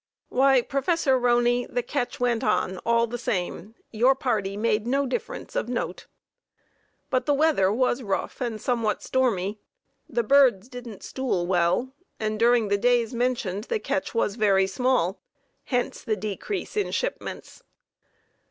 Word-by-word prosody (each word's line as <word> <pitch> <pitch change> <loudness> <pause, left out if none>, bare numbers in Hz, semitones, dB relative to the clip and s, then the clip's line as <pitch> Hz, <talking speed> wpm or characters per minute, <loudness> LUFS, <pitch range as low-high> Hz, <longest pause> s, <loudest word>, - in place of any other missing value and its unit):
Why, 265 -1 +4
Prof. 305 +7 -1
Roney, 245 -2 +3
the 245 - -2
catch 280 -4 -3
went 245 -1 +1
on 185 -6 0
all 235 0 +3
the 240 +1 -5
same, 195 -1 -3 0.2
your 245 +5 +4
party 210 -7 -1
made 215 0 0
no 275 +3 +1
difference 260 - -5
of - - -1
note, - - -4 1.0
but 255 -1 0
the 290 - +3
weather 285 -11 +3
was 250 +3 +1
rough 200 +4 -3
and 235 -3 -2
somewhat 230 -2 -1
stormy; 215 -6 0 0.5
the 240 -4 0
birds 245 -4 +4
didn't 245 -5 -9
"stool" 250 -10 -2
well, 180 +8 +1 0.3
and 215 -1 -2
during 235 -2 +4
the 200 0 +2
days 240 0 +2
mentioned 235 -5 -1
the 460 - -1
catch 285 - -3
was 210 -1 0
very 195 -3 +4
small, 200 -3 0 0.4
hence 245 -2 -1
the 220 -3 -1
decrease 215 - -4
in 415 - 0
shipments. - - -4
240 Hz, 145 wpm, -25 LUFS, 210-260 Hz, 1.0 s, Why